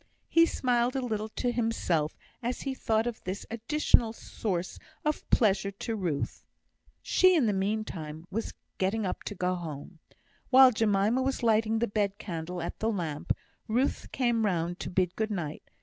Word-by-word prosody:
He 330 Hz, 0 st, +6 dB
smiled 245 Hz, -2 st, +1 dB
a 265 Hz, -2 st, -1 dB
little 215 Hz, -2 st, -2 dB
to 245 Hz, +2 st, -1 dB
himself 225 Hz, -10 st, 0 dB, 0.2 s
as 245 Hz, +1 st, -2 dB
he 270 Hz, -, -2 dB
thought 225 Hz, -3 st, +1 dB
of 240 Hz, -2 st, -4 dB
this 185 Hz, +2 st, -4 dB
additional 230 Hz, -1 st, +2 dB
source 185 Hz, -5 st, -4 dB, 0.3 s
of 300 Hz, 0 st, -1 dB
pleasure 200 Hz, -4 st, +3 dB
to 210 Hz, +3 st, -4 dB
Ruth. 175 Hz, -9 st, -2 dB, 0.6 s
She, 370 Hz, 0 st, +5 dB
in 300 Hz, -7 st, +4 dB
the 210 Hz, -, +2 dB
meantime, 190 Hz, -6 st, -3 dB
was 225 Hz, +4 st, -3 dB, 0.3 s
getting 200 Hz, +3 st, +1 dB
up 185 Hz, -, -3 dB
to 205 Hz, -, -4 dB
go 180 Hz, 0 st, 0 dB
home. 165 Hz, -1 st, -7 dB, 0.5 s
While 260 Hz, 0 st, +8 dB
Jemima 215 Hz, +2 st, +2 dB
was 265 Hz, -1 st, -1 dB
lighting 225 Hz, 0 st, +3 dB
the 235 Hz, +1 st, +1 dB
bed 200 Hz, -1 st, 0 dB
candle 175 Hz, -3 st, -5 dB
at -, -, -5 dB
the 220 Hz, -, +1 dB
lamp, 165 Hz, -8 st, -2 dB, 0.4 s
Ruth 245 Hz, +5 st, 0 dB
came 240 Hz, -3 st, +1 dB
round 175 Hz, -3 st, 0 dB
to -, -, -4 dB
bid 180 Hz, -1 st, 0 dB
good 220 Hz, 0 st, -1 dB
night. 170 Hz, -7 st, -4 dB
215 Hz, 165 wpm, -29 LUFS, 180-235 Hz, 0.6 s, While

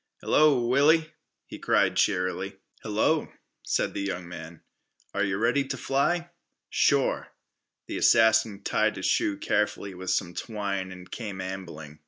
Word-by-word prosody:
"Hello, 145 Hz, -5 st, +4 dB
Willie," 155 Hz, +6 st, +3 dB, 0.3 s
he -, -, -10 dB
cried -, -, +2 dB
cheerily. 95 Hz, +2 st, 0 dB, 0.2 s
"Hello," 110 Hz, +9 st, 0 dB, 0.3 s
said -, -, -1 dB
the -, -, -3 dB
young 90 Hz, -3 st, -4 dB
man. 80 Hz, -1 st, -9 dB, 0.5 s
"Are 100 Hz, -, 0 dB
yeh 100 Hz, -1 st, 0 dB
ready 120 Hz, +7 st, +2 dB
t' 135 Hz, -, -5 dB
fly?" 170 Hz, +6 st, 0 dB, 0.4 s
"Sure." 140 Hz, -2 st, +2 dB, 0.6 s
The -, -, -5 dB
assassin 110 Hz, -2 st, +4 dB
tied -, -, +1 dB
his -, -, -5 dB
shoe 100 Hz, -, +1 dB
carefully 100 Hz, -1 st, -1 dB
with 95 Hz, 0 st, -6 dB
some 85 Hz, -, 0 dB
twine 100 Hz, -4 st, -4 dB
and 90 Hz, -1 st, -12 dB
came 105 Hz, -5 st, -6 dB
ambling. 85 Hz, -6 st, -7 dB
100 Hz, 140 wpm, -27 LUFS, 95-130 Hz, 0.6 s, Hello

